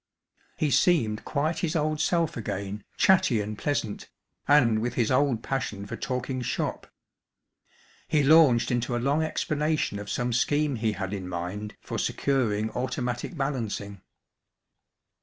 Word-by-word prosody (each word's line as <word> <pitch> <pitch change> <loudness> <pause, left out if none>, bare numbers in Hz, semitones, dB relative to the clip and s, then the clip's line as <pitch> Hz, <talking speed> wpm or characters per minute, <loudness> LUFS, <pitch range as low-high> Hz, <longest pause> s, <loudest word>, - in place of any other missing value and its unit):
He 150 -2 +1
seemed 115 -14 +2
quite 155 +3 -1
his 170 -1 -1
old 155 -1 0
self 165 0 +1
again, 100 -2 -4
chatty 185 - +4
and 105 +1 -3
pleasant, 110 -4 -3 0.4
and 120 -7 +5
with 120 +2 -2
his 115 -1 +1
old 130 -3 +2
passion 105 -7 -3
for - - -6
talking 125 0 -3
"shop." 120 - -3 1.2
He 150 -2 +2
launched 140 -6 +5
into 120 0 0
a - - +1
long 140 +6 +1
explanation 155 -6 -1
of 105 0 -7
some 120 0 -1
scheme 145 +2 +1
he 110 -1 0
had 95 0 -4
in 95 -2 -5
mind 90 +4 -5
for - - -4
securing 110 -6 0
automatic 125 +4 -3
balancing. 110 -8 -3
125 Hz, 140 wpm, -27 LUFS, 105-150 Hz, 1.2 s, and